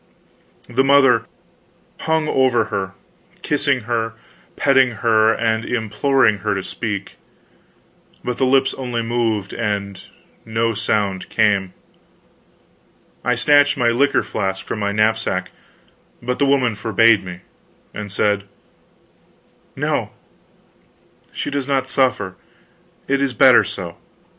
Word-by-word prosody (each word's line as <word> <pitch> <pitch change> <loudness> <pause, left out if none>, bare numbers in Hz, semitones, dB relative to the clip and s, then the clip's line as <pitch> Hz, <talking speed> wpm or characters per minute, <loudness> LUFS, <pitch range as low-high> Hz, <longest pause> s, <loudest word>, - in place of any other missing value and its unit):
The 130 +3 +1
mother 140 0 +4 0.7
hung 160 -1 0
over 130 -5 +2
her, 95 -1 -3 0.5
kissing 145 -3 0
her, 115 0 -2 0.4
petting 135 -3 +3
her, 110 -1 +4
and 110 0 0
imploring 115 0 +1
her 105 +1 -1
to 95 - -3
speak, 100 -2 -5 1.1
but 125 0 -4
the 135 - +3
lips 135 0 +3
only 120 -3 -3
moved 115 -4 -1
and 100 -3 -3 0.4
no 115 +1 -1
sound 105 -3 -1
came. 100 -4 +1 1.5
I 125 0 +1
snatched 145 +3 +4
my 120 -3 +2
liquor 135 +5 +2
flask 95 -2 -3
from 110 - -4
my 100 0 -1
knapsack, 110 +2 0 0.7
but 125 +1 -3
the 140 - +3
woman 130 -4 +2
forbade 110 0 +3
me, 90 -1 -9 0.5
and 105 -2 -7
said: 100 0 0 1.3
"No - - -1 1.2
she - - -4
does 140 -2 -3
not 135 -2 0
suffer; 125 -9 0 0.7
it 140 0 +1
is 140 -2 0
better - - +6
so. - - -6
115 Hz, 115 wpm, -19 LUFS, 105-130 Hz, 1.5 s, better